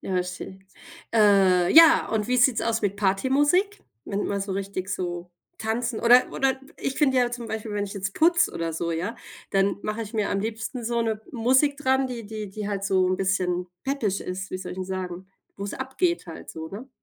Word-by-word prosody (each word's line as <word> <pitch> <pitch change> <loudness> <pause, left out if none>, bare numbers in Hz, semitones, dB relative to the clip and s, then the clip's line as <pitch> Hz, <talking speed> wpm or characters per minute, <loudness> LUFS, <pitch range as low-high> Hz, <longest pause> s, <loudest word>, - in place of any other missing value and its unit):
Ja, 185 -1 -1
schön. 190 +1 -8 0.5
Äh, 195 -4 +5
ja, 325 0 +8
und 215 -2 0
wie 250 - +1
sieht's 245 -1 +4
aus 225 -1 -1
mit 200 -1 0
Partymusik, 285 - +2 0.2
wenn 200 - -3
du - - -1
man 200 0 -2
so 195 +1 -4
richtig 195 -1 -4
so 175 -2 -4 0.3
tanzen 230 +1 -2
oder 245 +2 +5
oder 270 -1 0 0.2
ich 270 - -3
finde 270 -4 +3
ja 245 -1 +2
zum 240 -1 -6
Beispiel, 220 -1 -5
wenn 205 0 -1
ich 200 - -8
jetzt 200 0 -3
putze 340 - +3
oder 165 0 -3
so, 170 +1 -2
ja, 175 +7 -2 0.4
dann 195 0 +2
mache 215 +2 -3
ich 215 0 -9
mir 215 -3 -1
am 195 - 0
liebsten 225 +3 -4
so 235 0 0
'ne 220 -2 -1
Musik 260 +4 +2
dran, 265 -1 +1
die 235 -3 -6
die 215 -1 -6
die 210 +1 -5
halt 200 -1 -3
so 190 -2 +2
'n 185 - +1
bisschen 180 -2 0 0.2
peppig 235 -8 -1
ist. 190 +1 -5
Wie 185 - -4
soll 185 - -6
ich 185 - -8
'n 185 - -2
sagen, 185 -1 -5 0.3
wo's 200 0 -5
abgeht 300 - -1
halt 165 - -9
so, 160 0 -7
ne? 215 +9 -9
210 Hz, 210 wpm, -25 LUFS, 190-245 Hz, 0.5 s, ja